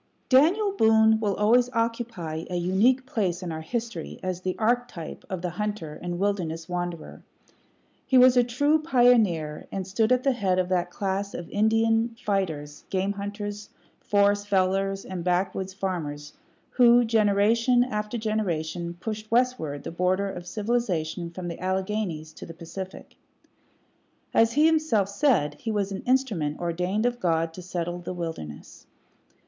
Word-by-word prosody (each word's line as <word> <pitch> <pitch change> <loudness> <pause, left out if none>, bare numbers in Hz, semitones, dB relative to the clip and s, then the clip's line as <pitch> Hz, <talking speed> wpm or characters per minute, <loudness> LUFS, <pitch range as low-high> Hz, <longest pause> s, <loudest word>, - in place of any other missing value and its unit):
Daniel 345 +11 +4
Boone 220 - +4
will 205 -3 0
always 240 +4 +3
occupy 230 -9 -2
a 180 - -3
unique 200 +9 +2
place 190 -8 -1
in 175 - -4
our 160 0 -5
history 235 +7 -5
as 185 -1 -3
the 185 0 -3
archetype 235 -7 -2
of 185 -3 -4
the 180 - -2
hunter 205 -5 -4
and 175 0 -4
wilderness 175 -5 -2
wanderer. 175 -2 -5 0.9
He 260 - +4
was 255 0 +7
a 245 - +5
true 285 +6 +2
pioneer, 225 - +2
and 195 -1 -3
stood 220 +5 0
at 255 0 +3
the 275 - +3
head 195 -7 0
of 185 -1 0
that 180 -1 0
class 195 +1 -3
of 170 - -6
Indian 225 +2 +2
fighters, 160 -10 -2
game 190 +1 0
hunters, 205 +1 -6 0.3
forest 205 0 +2
fellers, 195 0 +1
and 185 -2 -5
backwoods 185 +1 -1
farmers 150 -7 -4 0.4
who, 245 -1 +5
generation 225 +3 +3
after 210 -1 -3
generation, 175 -6 -2
pushed 215 +1 -5
westward 230 - 0
the - - -5
border 185 +3 0
of 175 -2 -8
civilization 185 -6 -2
from 175 +1 -7
the 170 - -6
Alleghanies 185 -4 -2
to - - -10
the 165 - -10
Pacific. 185 +3 -9 1.2
As 230 0 +4
he 300 +4 +4
himself 310 -12 +2
said, 200 - +1
he 225 - -4
was 205 -2 -1
"an 195 - -4
instrument 215 - 0
ordained 180 +5 -1
of 245 0 0
God 165 -4 0
to 180 - -9
settle 175 -1 -4
the 175 +1 -6
wilderness." 160 - -7
200 Hz, 150 wpm, -26 LUFS, 175-230 Hz, 1.2 s, was